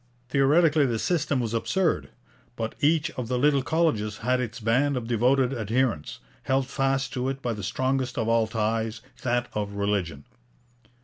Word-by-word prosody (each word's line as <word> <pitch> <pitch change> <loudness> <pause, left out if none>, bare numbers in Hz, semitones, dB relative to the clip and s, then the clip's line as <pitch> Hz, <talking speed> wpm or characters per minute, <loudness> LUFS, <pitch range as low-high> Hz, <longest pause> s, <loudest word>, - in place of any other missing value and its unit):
Theoretically 145 +2 +4
this 115 -3 -2
system 155 -6 +1
was 115 -2 -2
absurd. 170 +9 0 0.5
But 115 -1 -3
each 155 +1 +2
of 125 -3 -5
the 125 +1 -1
little 140 +1 +3
colleges 130 -9 0
had 125 0 +2
its 120 -2 -4
band 130 +5 +1
of 120 - -4
devoted 125 +3 +2
adherents, 115 - -1 0.2
held 135 0 +1
fast 135 0 -1
to 130 +1 -1
it 135 0 -4
by 120 - -1
the 105 - -6
strongest 130 +5 -1
of 115 -2 0
all 115 -1 +3
ties, 110 0 -1 0.2
that 120 -1 0
of 105 -1 -3
religion. 100 -8 -2
125 Hz, 165 wpm, -26 LUFS, 110-135 Hz, 0.5 s, Theoretically